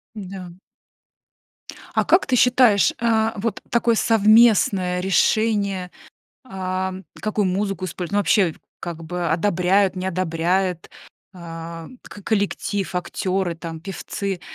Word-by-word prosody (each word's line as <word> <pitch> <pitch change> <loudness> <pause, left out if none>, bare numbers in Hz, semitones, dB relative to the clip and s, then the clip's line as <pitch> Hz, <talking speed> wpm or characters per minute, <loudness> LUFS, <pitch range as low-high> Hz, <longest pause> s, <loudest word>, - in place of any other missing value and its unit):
М-да. 190 -3 -8 1.4
А - - +2
как 360 - +4
ты 255 - +1
считаешь 245 -6 +4
а, 225 -1 +1
вот 225 +2 -3
такое 235 -1 +2
совместное 215 -5 +4
решение, 195 -1 +1 0.5
ам, 190 -3 -4 0.2
какую 215 -1 -1
музыку 195 0 -2
используют, 180 0 -5
ну 205 - +2
вообще, 195 -5 +2 0.3
как 165 -1 -6
бы, 175 +1 -3
одобряют, 185 +2 +2
не 185 +1 -3
одобряют, 180 0 -1 0.5
э, 165 -1 -8 0.2
к 205 - -12
коллектив, 200 -2 -1
актеры 185 0 -2
там, 165 -1 -7
певцы- 195 0 -5
190 Hz, 110 wpm, -22 LUFS, 180-210 Hz, 1.4 s, как